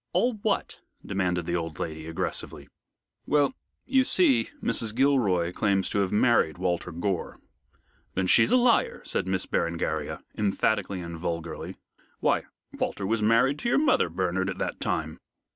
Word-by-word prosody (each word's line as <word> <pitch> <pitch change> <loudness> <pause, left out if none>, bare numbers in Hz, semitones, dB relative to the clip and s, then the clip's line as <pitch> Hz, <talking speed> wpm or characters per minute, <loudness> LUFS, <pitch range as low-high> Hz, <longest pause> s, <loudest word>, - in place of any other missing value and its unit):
"All 245 +1 +2
what?" 205 -2 -1 0.3
demanded 90 -3 -1
the 85 - -1
old 80 -2 -3
lady, 80 -1 -5
aggressively. 80 - -3 0.6
"Well, 145 - +3 0.3
you 265 0 +3
see, 290 0 +3
Mrs. 110 - -1
Gilroy 110 -11 +2
claims 100 -2 +1
to 100 - +1
have 95 -2 0
married 105 -7 +3
Walter 90 -1 -1
Gore." 90 +2 -3 0.8
"Then 95 - +1
she's 90 - +5
a 255 - +6
liar," 245 -1 +2
said - - -2
Miss 95 -1 0
Berengaria, 85 0 -2
emphatically 100 -2 0
and 85 -1 -7
vulgarly. 85 -1 -4 0.4
"Why, - - +1 0.3
Walter 100 - -3
was 110 +2 0
married 115 +6 +3
to 235 - -1
your - - +3
mother, 280 - +3
Bernard, 95 +2 -1
at - - -4
that - - -3
time." - - -2
95 Hz, 150 wpm, -27 LUFS, 85-125 Hz, 0.8 s, a